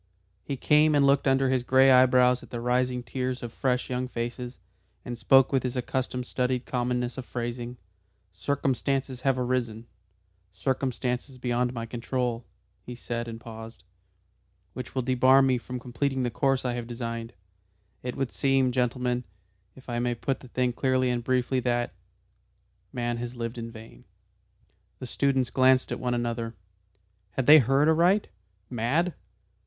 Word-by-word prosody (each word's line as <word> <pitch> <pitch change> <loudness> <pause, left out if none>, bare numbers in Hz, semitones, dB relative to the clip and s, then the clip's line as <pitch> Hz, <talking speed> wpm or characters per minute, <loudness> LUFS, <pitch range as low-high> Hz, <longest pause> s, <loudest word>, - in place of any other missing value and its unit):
He 140 - -4
came 150 +3 +4
and 140 -1 +4
looked 140 0 +3
under 135 0 +3
his 130 -1 +2
grey 130 +2 +5
eyebrows 125 -1 +5
at - - -14
the 120 - -5
rising 125 +1 0
tiers 130 0 -3
of 120 - -5 0.4
young 125 0 -2
fresh - - -19
faces, 120 +1 -4 0.5
and 120 - -4
spoke 130 +4 +5
with 135 - +3
his 125 0 -3
accustomed 125 0 -2
studied 125 0 -1
commonness 125 0 -2
of 130 - -6
phrasing. 120 0 -4 0.6
"Circumstances 135 +3 -1
have 135 0 +2
arisen 120 -3 -1 0.7
circumstances 130 +4 -2
beyond 125 0 0
my 115 -2 -5
control," 120 0 -3 0.4
he 125 - -8
said 120 -1 -4
and 115 -1 -7
paused, 115 -2 -10 0.9
"which 130 0 -7
will 130 - 0
debar 130 +2 +5
me 130 -2 +2
from 125 +1 -6
completing 130 +2 -2
the 120 - -1
course 135 +2 +1
I 125 - 0
had 120 -1 -4
designed. 115 -1 -5 0.7
It 125 -1 -4
would 135 -4 -1
seem, 135 +5 +2
gentlemen, 125 0 0 0.5
if 130 - -16
I 120 -1 -2
may 120 0 0
put 135 +3 -2
the - - -13
thing 125 0 0
clearly 130 0 +1
and 120 -1 -2
briefly, 130 +1 +1
that 120 -1 -1 1.0
Man 120 -1 -2
has 120 +1 -5
lived 115 0 -4
in 115 0 -5
vain." 110 - -13 0.9
The - - -7
students 135 0 0
glanced 130 0 +4
at - - -3
one 125 -1 -1
another. 115 -1 -3 0.8
Had 135 - -1
they 155 +3 +9
heard 135 +4 +3
aright? 175 +6 +3 0.4
Mad? 135 +9 0
125 Hz, 155 wpm, -27 LUFS, 120-130 Hz, 1.0 s, they